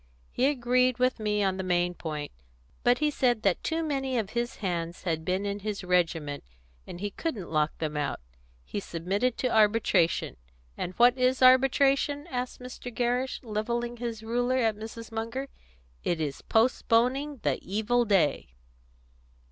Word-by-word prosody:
"He 255 - +2
agreed 250 -2 +2
with 255 -1 +1
me 210 -1 0
on 190 -1 +1
the 190 - -3
main 175 -1 +1
point, 150 -4 -5 0.5
but 245 +1 +4
he 300 0 +1
said 245 -5 +1
that 195 -3 +1
too 325 0 -1
many 270 -4 -1
of 215 -3 -2
his 240 0 -2
hands 170 -3 -3
had 160 -3 -1
been 185 +4 -1
in 200 0 -2
his 205 -1 -4
regiment, 165 -5 0 0.4
and 175 - -8
he 205 +1 -3
couldn't 215 - -4
lock 155 -1 +1
them 155 -2 -3
out. 145 -1 -2 0.5
He - - -4
submitted 200 +7 -1
to 255 -3 0
arbitration. 210 -5 +3 0.4
And 180 - -4
what 245 +1 +6
is 255 +1 +2
arbitration?" 270 +3 +4
asked 250 0 -3
Mr. 250 0 -8
Gerrish, 245 +2 -1
levelling 235 +2 -2
his 230 -2 -5
ruler 245 +3 0
at 225 -4 +2
Mrs. 225 +2 -8
Munger. 230 +5 -4 0.5
"It 170 - 0
is 145 -3 -3
postponing 255 +4 +2
the - - +1
evil 220 +5 +1
day." 170 - +1
225 Hz, 155 wpm, -28 LUFS, 185-250 Hz, 0.5 s, what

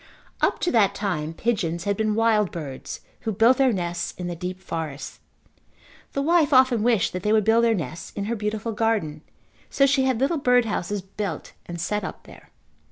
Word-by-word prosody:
Up - - +2
to 355 - +1
that 215 -5 +3
time 160 -7 -2
pigeons 170 -4 -1
had 200 -1 0
been 215 0 0
wild 220 -3 +2
birds 140 -6 -7 0.2
who 225 - -3
built 230 +5 +4
their 265 -2 +4
nests 175 -4 -3
in 180 - -5
the 175 0 -3
deep 180 +2 -5
forest. 160 -6 -6 0.9
The 275 - -1
wife 325 -1 +3
often 255 -4 +5
wished 225 -4 +2
that 180 - -3
they 210 - 0
would 215 -1 +4
build 225 +1 +4
their 230 -1 +3
nests 160 -2 -5
in 200 - -2
her 230 +3 -1
beautiful 215 +1 -3
garden 210 -9 -1 0.5
so 275 - +3
she 270 -1 +3
had 260 -3 +1
little 290 +4 +1
bird 250 -3 +4
houses 205 -2 -2
built 195 -4 -5
and 170 0 -6
set 210 +4 -1
up - - -7
there. - - -15
210 Hz, 195 wpm, -24 LUFS, 175-235 Hz, 0.9 s, often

